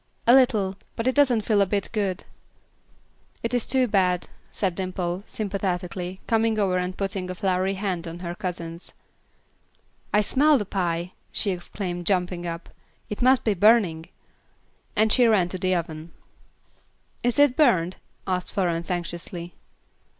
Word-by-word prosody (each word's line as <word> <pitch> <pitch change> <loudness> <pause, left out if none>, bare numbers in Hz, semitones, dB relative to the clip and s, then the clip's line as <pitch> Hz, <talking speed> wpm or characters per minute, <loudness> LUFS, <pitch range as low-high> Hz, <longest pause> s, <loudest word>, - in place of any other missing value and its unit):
"A 235 - +7
little; 215 -7 +4 0.2
but 230 - -3
it 260 - +3
doesn't 255 -6 +4
feel 210 -1 +2
a 200 - +3
bit 200 0 -1
good." 200 -4 -1 1.2
"It 230 +1 -1
is 245 -2 0
too 260 0 +3
bad," 185 -4 +1 0.2
said 190 -3 -1
Dimple, 185 0 -3
sympathetically, 185 -3 -3
coming 225 -1 +2
over 190 -3 +2
and 180 +1 -3
putting 195 -2 -3
a 185 - -4
floury 190 +1 0
hand 185 -4 -3
on 165 +1 -6
her 175 -1 -5
cousin's. 170 -2 -6 1.2
"I 210 - +4
smell 290 +7 +4
the 210 - -2
pie," 175 -2 -2 0.2
she 200 - -1
exclaimed, 175 -1 -5
jumping 180 -2 0
up. 170 +1 -5 0.4
"It 210 - -4
must 255 +1 +4
be 215 - +2
burning," 195 -5 +3 0.9
and 215 0 +3
she 245 -2 +5
ran 195 -6 +3
to 185 - -4
the 185 0 +1
oven. 160 -1 -5 1.1
"Is 245 -1 0
it 285 -3 +5
burned?" 185 - +3 0.3
asked 180 -1 -2
Florence, 170 -3 -1
anxiously. 175 0 -4
190 Hz, 150 wpm, -25 LUFS, 175-215 Hz, 1.2 s, A